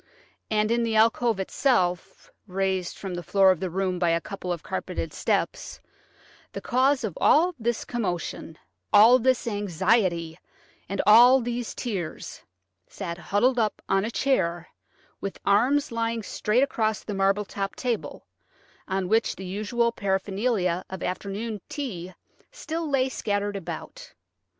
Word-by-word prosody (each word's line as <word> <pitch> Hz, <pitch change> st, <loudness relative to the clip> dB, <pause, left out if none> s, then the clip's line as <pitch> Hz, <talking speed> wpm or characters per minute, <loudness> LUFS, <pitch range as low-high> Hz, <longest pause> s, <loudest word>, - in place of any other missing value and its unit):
And 215 Hz, 0 st, +1 dB
in 235 Hz, 0 st, +2 dB
the 230 Hz, -1 st, 0 dB
alcove 225 Hz, 0 st, +3 dB
itself, 190 Hz, -4 st, 0 dB, 0.2 s
raised 190 Hz, -1 st, -2 dB
from 195 Hz, -2 st, -6 dB
the 175 Hz, -, -4 dB
floor 195 Hz, +1 st, +4 dB
of 185 Hz, -, -1 dB
the 185 Hz, -, -2 dB
room 185 Hz, 0 st, -1 dB
by 175 Hz, -1 st, +2 dB
a 165 Hz, 0 st, +2 dB
couple 185 Hz, 0 st, -6 dB
of 170 Hz, -3 st, -4 dB
carpeted -, -, -4 dB
steps, -, -, -2 dB, 0.7 s
the -, -, -4 dB
cause 260 Hz, +2 st, +2 dB
of 205 Hz, -7 st, -3 dB
all 350 Hz, +4 st, +4 dB
this 235 Hz, 0 st, -1 dB
commotion, 180 Hz, -7 st, -4 dB, 0.3 s
all 225 Hz, +5 st, +7 dB
this 255 Hz, +1 st, +1 dB
anxiety, 190 Hz, -4 st, 0 dB, 0.5 s
and 195 Hz, -, -1 dB
all 240 Hz, +5 st, +8 dB
these 240 Hz, -1 st, -4 dB
tears, 195 Hz, -10 st, -5 dB, 0.5 s
sat 170 Hz, -3 st, -6 dB
huddled 240 Hz, +8 st, +1 dB
up 215 Hz, -2 st, 0 dB
on 195 Hz, -, +2 dB
a 220 Hz, -, -2 dB
chair, 175 Hz, -10 st, 0 dB, 0.5 s
with 195 Hz, -, -5 dB
arms 250 Hz, +9 st, +3 dB
lying 230 Hz, -1 st, -2 dB
straight 215 Hz, +5 st, +1 dB
across 220 Hz, -5 st, -1 dB
the 210 Hz, -, -5 dB
marble 195 Hz, +1 st, +1 dB
topped 195 Hz, 0 st, -5 dB
table, 245 Hz, -3 st, -3 dB, 0.6 s
on 190 Hz, -1 st, -1 dB
which 220 Hz, +3 st, +1 dB
the 190 Hz, -, -8 dB
usual 215 Hz, +5 st, 0 dB
paraphernalia 195 Hz, -2 st, -1 dB
of 190 Hz, -1 st, -6 dB
afternoon 200 Hz, +3 st, -4 dB
tea 185 Hz, -, -5 dB, 0.4 s
still 330 Hz, -9 st, -4 dB
lay 270 Hz, -2 st, +2 dB
scattered 205 Hz, -4 st, -2 dB
about. 195 Hz, -, -7 dB
205 Hz, 140 wpm, -26 LUFS, 185-235 Hz, 0.7 s, all